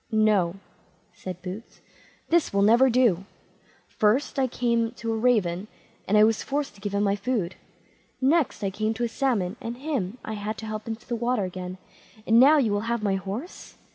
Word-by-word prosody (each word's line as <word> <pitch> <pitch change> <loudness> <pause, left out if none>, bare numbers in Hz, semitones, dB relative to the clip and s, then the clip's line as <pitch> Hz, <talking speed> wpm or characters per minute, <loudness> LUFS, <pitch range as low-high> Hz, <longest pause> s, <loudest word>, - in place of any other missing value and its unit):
"No", 210 -5 +3 0.6
said 185 -1 -8
Boots, 190 +5 -8 0.5
"this 335 -1 +2
will 200 0 +2
never 235 +5 +5
do; 230 -7 +3 0.6
"first 230 +7 +1
I 260 - +3
came 235 -2 0
to 230 -1 -3
a - - -1
raven, 215 -5 +1 0.4
and 210 - +3
I 210 - +7
was 220 0 +3
forced 285 -2 -2
to 200 - -18
give 200 0 -3
him 200 - +2
my 200 -1 +2
food; 205 -4 -2 0.7
next 285 -2 +1
I 195 - 0
came 215 +3 -1
to 240 - -3
a - - +2
salmon, 230 -6 -1
and 230 +1 -5
him 255 - -3
I 220 - -4
had 210 +1 -4
to 220 - -7
help 215 0 -5
into 225 0 -6
the 240 - -3
water 235 -1 0
again; 185 0 -6 0.5
and 225 +1 +5
now 290 +5 +7
you 240 -7 +2
will 205 +3 -1
have 235 -2 -1
my 200 -2 +1
horse. 195 - -6
220 Hz, 195 wpm, -26 LUFS, 200-245 Hz, 0.7 s, I